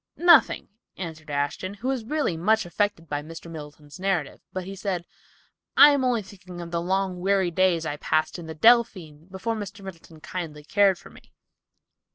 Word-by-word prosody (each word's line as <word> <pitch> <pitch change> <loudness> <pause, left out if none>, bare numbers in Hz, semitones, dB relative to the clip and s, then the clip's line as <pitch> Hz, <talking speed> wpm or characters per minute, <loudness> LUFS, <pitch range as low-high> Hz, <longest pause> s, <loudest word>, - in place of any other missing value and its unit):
"Nothing," 340 -4 +5 0.3
answered 160 -4 -7
Ashton, 145 +7 -2
who 245 +6 -4 0.2
really 290 - 0
was 165 - -8
much 220 +1 +3
affected 175 -2 -1
by 145 -1 -2
Mr. 165 +2 -10
Middleton's 150 0 -10
narrative; 185 -7 -1
but 185 - -4
he 195 +2 -7
said, 185 -3 -3 0.7
"I 295 - +10
am 280 -2 +1
only 245 -4 +1
thinking 185 -2 -12
of 170 -1 -7
the 170 -1 -1
long, 190 0 -1
weary 190 -1 +1
days 170 -2 +2
I 145 - -3
passed 155 +4 0
in 165 - -9
the 160 - -7
Delphine 185 -7 +3
before 190 +4 -3
Mr. 205 -1 -7
Middleton 165 -3 -11
kindly 155 -3 -6
cared 200 +3 +3
for - - -15
me." - - -18
185 Hz, 180 wpm, -25 LUFS, 160-200 Hz, 0.7 s, I